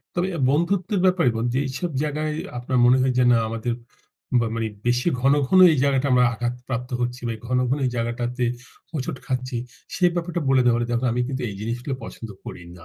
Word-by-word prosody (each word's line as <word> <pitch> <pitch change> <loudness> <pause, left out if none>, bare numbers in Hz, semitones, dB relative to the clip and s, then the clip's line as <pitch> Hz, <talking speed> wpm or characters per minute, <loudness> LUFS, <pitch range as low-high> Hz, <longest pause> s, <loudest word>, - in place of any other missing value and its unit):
তবে 180 +2 0
আর 140 - -2
বন্ধুত্বের 180 +6 +1
ব্যাপারে 185 -8 +4
মানে, 115 +2 0
যেইসব 140 +6 -2
জায়গায় 155 +1 -2 0.3
আপনার 125 +1 -1
মনে 125 +1 +6
হয় 130 -1 +2
যে - - +5
না 120 - +5
আমাদের 115 +1 -2 0.7
বা 115 - 0
মানে 115 - -1 0.2
বেশি 125 +6 +2
ঘন, 135 +2 +4 0.2
ঘন, 185 - +5
এই 150 - 0
জায়গাটা 140 0 +2
আমরা 125 0 +5
আঘাতপ্রাপ্ত 125 +1 -4
হচ্ছি 125 +1 -3
বা 115 - -1
এই - - -19
ঘন, 125 +1 +1
ঘন, 135 - +1
এই - - 0
জায়গাটাতে 120 +2 -2 0.5
হোঁচট 135 -4 -3
খাচ্ছি, 130 -2 -2 0.4
সেই 180 -2 +4
ব্যাপারটা 175 0 -2
বলে 130 -1 +4
দেওয়ার 120 -1 +3
ই - - -4
দেখো 120 +1 0
আমি 125 - 0
কিন্তু 130 -1 -3
এই 100 - -6
জিনিসগুলো 120 +5 -3
পছন্দ 115 - -8 0.2
করি 90 - -8 0.2
না। 80 - -14
125 Hz, 205 wpm, -23 LUFS, 120-150 Hz, 0.7 s, মনে